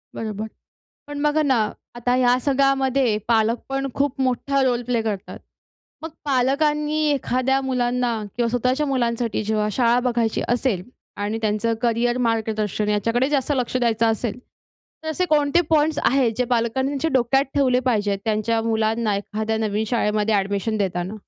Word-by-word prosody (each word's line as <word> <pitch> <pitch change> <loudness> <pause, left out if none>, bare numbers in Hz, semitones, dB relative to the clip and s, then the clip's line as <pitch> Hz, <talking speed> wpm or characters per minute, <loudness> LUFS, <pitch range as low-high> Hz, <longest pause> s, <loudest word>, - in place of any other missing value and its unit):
बरोबर. 215 -1 -4 0.6
पण 290 0 -5
बघा 300 +1 +2
ना, 270 -4 +2 0.4
आता 245 +1 0
ह्या 250 -1 +3
सगळ्यामध्ये 270 -3 +2
पालक 230 0 +2
पण 270 0 -2
खूप 275 -1 -1
मोठा 265 +2 0
रोल 245 -2 +1
प्ले 240 -2 0
करतात. 210 -3 -4 0.6
मग 320 - -4 0.2
पालकांनी 295 +3 +1
एखाद्या 265 0 0
मुलांना 250 -2 0 0.2
किंवा 240 -1 +1
स्वतःच्या 255 +5 0
मुलांसाठी 235 -4 -1
जेव्हा 215 0 0
शाळा 240 +1 +3
बघायची 235 -2 0
असेल 240 -6 0 0.4
आणि 215 +2 -2
त्यांचं 215 +2 0
करियर 240 +1 +1
मार्गदर्शन 215 -2 -1
याच्याकडे 230 +5 +1
जास्त 285 -1 0
लक्ष 250 0 -1
द्यायचं 230 -2 +2
असेल, 225 0 -1 0.6
तर 315 - -5
असे 365 +4 0
कोणते 300 +1 +3
पॉइंट्स 305 -1 +2
आहेत 255 -3 +3
जे 250 - +1
पालकांनी 240 +2 0
त्यांच्या 290 +3 -1
डोक्यात 265 +2 +3
ठेवले 255 -3 +3
पाहिजेत, 205 -3 0
त्यांच्या 225 +1 0
मुलांना 220 -1 0
एखाद्या 215 +2 -3
नवीन 215 0 -1
शाळेमध्ये 215 -2 +1
ॲडमिशन 200 +2 0
देताना? 185 -1 -2
240 Hz, 145 wpm, -22 LUFS, 220-270 Hz, 0.6 s, ह्या